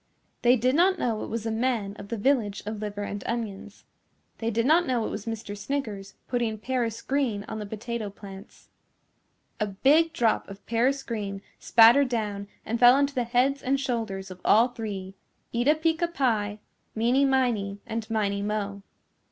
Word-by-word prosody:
They 245 +1 +5
did 255 +2 +1
not 365 +5 +4
know 230 -7 -1
it - - -5
was 230 0 -4
a 225 - -1
man 220 -3 -1
of 200 - -8
the 230 - -4
Village 215 -4 +1
of 215 0 -4
Liver 205 -1 -4
and 205 -1 -5
Onions. 210 -3 -5 0.5
They 225 - -1
did 230 +1 0
not 325 +4 +4
know 245 -4 0
it - - -3
was 210 +2 -6
Mr. 220 -2 -5
Sniggers 205 -3 -4
putting 235 -3 -1
paris 230 0 -2
green 260 -7 0
on 220 - -5
the 210 - -5
potato 220 0 -4
plants. 195 0 -12 0.9
A 210 - 0
big 285 +12 +3
drop 235 -11 +1
of 195 0 -11
paris 255 +4 +1
green 200 -4 -4 0.2
spattered 240 +4 +6
down 210 -4 -2 0.2
and 230 +1 -2
fell 245 +1 +8
onto 280 0 +1
the 250 -3 0
heads 255 +3 +1
and 270 +2 +1
shoulders 225 -8 -3
of 185 0 -11
all 230 +4 +5
three, 200 -5 -6 0.4
Eeta 245 +6 +3
Peeca 325 +2 +1
Pie, 220 -9 0 0.4
Meeny 240 +5 +3
Miney 245 -7 +1
and 225 0 -4
Miney 200 -2 0
Mo. 200 -1 -3
225 Hz, 175 wpm, -26 LUFS, 205-255 Hz, 0.9 s, fell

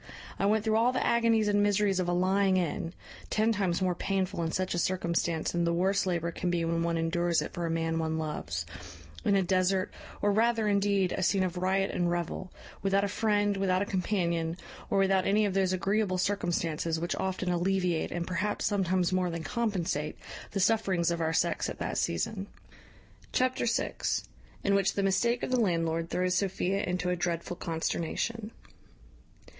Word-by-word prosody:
I 195 - +2
went 215 0 +2
through 220 -1 +2
all 235 +2 +4
the - - -1
agonies 230 -2 +3
and 205 0 +3
miseries 205 -1 +2
of 180 -1 0
a - - +2
lying 190 +2 +2
in 170 -1 -2 0.3
(ten 220 +1 +2
times 190 -4 0
more 180 -1 +2
painful 190 0 -1
in 165 -1 -1
such 185 +1 -1
a 175 - 0
circumstance 170 -2 0
than 175 0 0
the 170 0 +1
worst 195 +2 +1
labour 170 -2 -1
can 180 +2 -2
be 170 -1 0
when 165 0 0
one 170 0 0
endures 170 +1 +1
it - - -4
for 170 -1 -2
a - - -2
man 165 0 0
one 160 0 -1
loves) 85 - -3 0.6
in 200 - +3
a 195 - +3
desert, 185 +1 +1 0.3
or 205 - +2
rather, 225 +1 +2
indeed, 200 -2 +2
a - - -2
scene 190 +1 +2
of 180 -1 -2
riot 190 +2 +1
and 175 -1 0
revel, 175 +1 -3 0.3
without 195 0 +2
a - - +1
friend, 205 0 +1
without 190 -1 +2
a - - -3
companion, 170 -4 -1 0.3
or 200 - +1
without 195 -1 +3
any 210 +2 +3
of 200 - -1
those 190 -1 +2
agreeable 195 +1 0
circumstances 170 -4 -1
which 170 +1 -2
often 185 -1 -1
alleviate, 180 -1 0
and 175 -1 -2
perhaps 185 +4 -1
sometimes 185 -2 +1
more 185 -1 +1
than 165 -1 -4
compensate, 175 -6 -2 0.3
the 195 - -3
sufferings 190 -5 +2
of 170 -1 -2
our 160 0 +1
sex 160 - 0
at - - -6
that - - -2
season." 190 - -2 0.8
Chapter 255 -1 +1
vi. 230 - 0 0.7
In 200 - +2
which 195 -1 +2
the 200 - 0
mistake 235 +5 +1
of - - -2
the 255 - +3
landlord 165 -5 0
throws 180 0 0
Sophia 195 0 0
into 180 -1 -1
a - - +1
dreadful 175 0 -2
consternation. 175 +6 -2
185 Hz, 185 wpm, -29 LUFS, 170-200 Hz, 0.8 s, all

